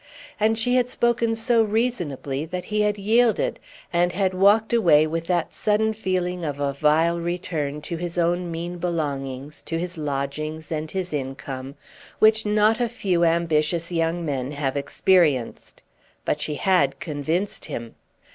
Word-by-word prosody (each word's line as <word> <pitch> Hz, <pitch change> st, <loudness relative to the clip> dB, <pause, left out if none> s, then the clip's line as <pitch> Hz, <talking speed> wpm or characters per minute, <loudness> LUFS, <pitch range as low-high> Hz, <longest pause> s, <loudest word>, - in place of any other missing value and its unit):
And 220 Hz, +1 st, +2 dB
she 245 Hz, +3 st, +2 dB
had 250 Hz, -1 st, +2 dB
spoken 235 Hz, -2 st, +1 dB
so 230 Hz, +1 st, +2 dB
reasonably, 185 Hz, -, -1 dB
that 180 Hz, +2 st, -5 dB
he 210 Hz, 0 st, 0 dB
had 210 Hz, 0 st, +1 dB
yielded, 220 Hz, +2 st, +2 dB, 0.3 s
and 175 Hz, +1 st, +2 dB
had 190 Hz, -1 st, +1 dB
walked 205 Hz, +5 st, +4 dB
away 165 Hz, -10 st, +5 dB
with 165 Hz, +1 st, -3 dB
that 175 Hz, -2 st, 0 dB
sudden 220 Hz, +1 st, +1 dB
feeling 180 Hz, -4 st, -2 dB
of 145 Hz, -3 st, -3 dB
a 140 Hz, -1 st, 0 dB
vile 160 Hz, +4 st, +2 dB
return 165 Hz, -4 st, -3 dB
to 170 Hz, -, -4 dB
his 175 Hz, +1 st, -5 dB
own 175 Hz, +1 st, +1 dB
mean 170 Hz, +1 st, -5 dB
belongings, 145 Hz, -5 st, -3 dB
to 165 Hz, -, -4 dB
his 175 Hz, 0 st, -5 dB
lodgings, 150 Hz, +2 st, -4 dB
and 155 Hz, 0 st, -3 dB
his 185 Hz, -2 st, -3 dB
income, 135 Hz, -1 st, -5 dB, 0.4 s
which 220 Hz, 0 st, +4 dB
not 215 Hz, +2 st, +3 dB
a 240 Hz, -1 st, +1 dB
few 185 Hz, -7 st, 0 dB
ambitious 165 Hz, 0 st, +1 dB
young 165 Hz, 0 st, 0 dB
men 135 Hz, -2 st, -2 dB
have 140 Hz, -2 st, -2 dB
experienced. 145 Hz, -3 st, +1 dB, 0.4 s
But -, -, 0 dB
she 150 Hz, -, -1 dB
had 145 Hz, -6 st, +2 dB
convinced 160 Hz, +6 st, -2 dB
him. 115 Hz, -1 st, -6 dB
170 Hz, 155 wpm, -24 LUFS, 150-205 Hz, 0.4 s, away